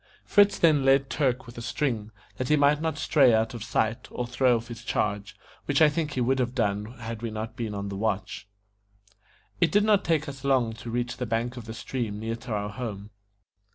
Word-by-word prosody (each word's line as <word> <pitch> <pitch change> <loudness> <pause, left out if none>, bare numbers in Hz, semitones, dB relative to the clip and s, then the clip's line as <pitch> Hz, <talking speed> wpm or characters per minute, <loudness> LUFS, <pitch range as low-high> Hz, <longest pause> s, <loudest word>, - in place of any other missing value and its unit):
Fritz 205 0 +4
then 155 -5 +4
led 135 0 +3
Turk 130 -4 0
with 120 0 -10
a - - -6
string, 120 -3 -2 0.3
that 130 - -3
he 150 - +5
might 145 +1 +3
not 160 -2 -1
stray 140 -6 +4
out 110 +3 0
of 115 -3 -6
sight, 115 -1 -1
or 125 - -3
throw 125 +1 +2
off 115 +1 -4
his 120 0 -8
charge, 105 -3 -2 0.3
which - - +1
I 155 -2 +7
think 150 -1 -2
he 130 - -1
would 130 +2 +2
have 125 0 -1
done 105 -4 0
had 115 -1 -6
we 115 - -3
not 110 +1 -5
been 110 -3 -4
on 100 0 -4
the 100 - -5
watch. 105 0 -2 1.1
It 170 - +3
did 205 0 +4
not 210 -2 +3
take 160 -2 +1
us 135 -1 -8
long 130 -5 +2
to 115 +1 -9
reach 120 +1 -2
the 125 - -3
bank 115 +2 -1
of 120 -3 -8
the 110 0 -7
stream 115 -4 -4
near 115 +1 -3
to 120 +1 -9
our 105 -1 -1
home. 105 -2 -6
120 Hz, 225 wpm, -27 LUFS, 110-135 Hz, 1.1 s, I